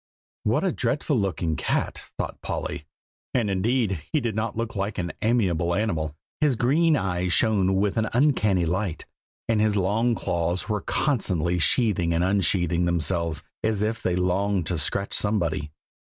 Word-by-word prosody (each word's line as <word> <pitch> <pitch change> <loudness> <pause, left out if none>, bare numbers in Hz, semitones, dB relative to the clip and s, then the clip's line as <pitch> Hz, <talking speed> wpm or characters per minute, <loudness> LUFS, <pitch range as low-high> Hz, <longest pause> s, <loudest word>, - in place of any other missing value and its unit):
"What - - +1
a - - +2
dreadful - - -1
looking 85 -4 -1
cat!" - - -1 0.2
thought - - -4
Polly. 75 - -4 0.5
And 115 -5 +1
indeed, 100 - 0
he 155 - +2
did 115 -4 -2
not 110 +1 -2
look 115 -1 -3
like 100 +2 -2
an 85 -2 -2
amiable 90 -7 +1
animal. 80 -8 -1 0.2
His 150 -4 +3
green 150 +8 +3
eyes 90 -4 -1
shone 95 -3 +3
with 100 +3 +1
an 110 -1 +1
uncanny 110 - +2
light, 90 +1 -2 0.4
and 110 -2 +2
his 105 -1 +2
long 110 +5 +1
claws 85 -2 -1
were 105 -2 -1
constantly 90 - 0
sheathing 90 -4 +2
and 85 - +2
unsheathing 90 -2 +2
themselves, 85 -2 0 0.2
as 110 -2 +1
if 110 +2 -1
they 90 - 0
longed 90 +1 +1
to 85 -1 -1
scratch 100 +6 -1
somebody. 85 -8 0
100 Hz, 155 wpm, -25 LUFS, 85-110 Hz, 0.5 s, His